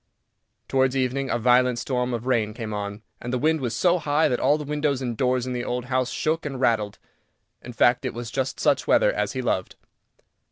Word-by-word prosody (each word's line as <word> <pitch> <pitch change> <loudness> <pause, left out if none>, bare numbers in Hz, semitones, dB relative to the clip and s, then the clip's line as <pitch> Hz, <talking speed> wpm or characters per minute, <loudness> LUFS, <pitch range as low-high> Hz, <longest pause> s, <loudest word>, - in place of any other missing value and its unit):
Towards 130 0 +2
evening 130 +1 -1
a - - +1
violent 125 +1 +3
storm 125 +1 -1
of 120 0 -3
rain 110 -5 0
came 115 -3 -5
on, 105 +1 -5 0.2
and 120 - -5
the 130 - 0
wind 155 +4 +1
was 120 -3 -2
so 180 +7 +3
high 150 0 +2
that 125 - 0
all 150 - +3
the 150 - -5
windows 145 -2 -1
and 125 -3 -3
doors 125 +1 +1
in 130 - -3
the 120 -1 -3
old 125 0 -3
house 130 -1 +1
shook 160 +1 -1
and 135 -3 -5
rattled. 110 -5 +1 0.6
In 125 - -9
fact, 120 +2 +3
it 130 - -3
was 120 -1 -6
just 135 -1 -2
such - - +2
weather - - +4
as - - -1
he - - -3
loved. - - -1
125 Hz, 215 wpm, -24 LUFS, 120-135 Hz, 0.6 s, weather